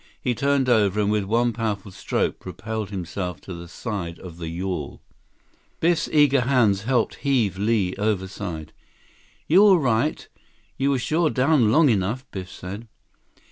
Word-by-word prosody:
He 125 - 0
turned 140 +2 +1
over, 105 -4 +3
and 105 0 +2
with 105 -2 0
one 120 +3 +1
powerful 105 -3 -3
stroke, - - -2
propelled 110 -2 -5
himself 90 -1 -4
to 95 - -8
the 85 0 -8
side 90 -3 -5
of 85 -3 -11
the 85 - -5
yawl. 85 -3 -4 0.8
Biff's 170 0 +1
eager 145 -3 +4
hands 115 -6 +2
helped 125 0 +1
heave 120 -9 0
Li 105 -3 +1
overside. 95 -5 -3 0.7
"You 180 +6 +6
all 200 -3 +7
right? 135 0 0 0.5
You 135 +1 0
were 140 - +2
sure 155 +6 +1
down 130 -5 +3
long 155 +5 +5
enough!" 110 +5 0
Biff 95 -1 -6
said. 100 +5 -8
110 Hz, 150 wpm, -23 LUFS, 95-130 Hz, 0.8 s, all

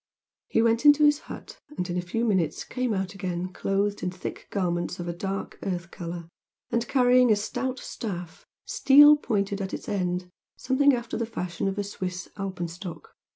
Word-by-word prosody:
He 225 - +2
went 230 0 +2
into 295 0 +7
his 295 0 +5
hut, - - -9 0.2
and 180 - -1
in 175 - -3
a 180 - 0
few 225 +7 -2
minutes 190 -8 +1
came 255 -2 -2
out 190 -2 -2
again 185 -2 -4
clothed 200 +2 0
in 180 - -1
thick 180 0 -7
garments 175 -2 -1
of 175 - -4
a 170 - -2
dark, 195 +3 -4
earth 175 -3 -3
colour, 170 -2 -6 0.4
and 235 0 0
carrying 250 -1 +5
a - - +6
stout 245 +5 -3
staff, 180 -10 -6 0.2
steel 290 +2 +7
pointed 200 -7 -1
at 190 - -3
its - - -9
end 180 -2 -1 0.3
something 265 +2 +3
after 235 -1 -4
the 230 -1 -2
fashion 180 -5 -3
of 195 +1 -2
a 205 - 0
Swiss 185 -2 -5
alpenstock. 180 -3 -6
195 Hz, 180 wpm, -26 LUFS, 180-235 Hz, 0.4 s, into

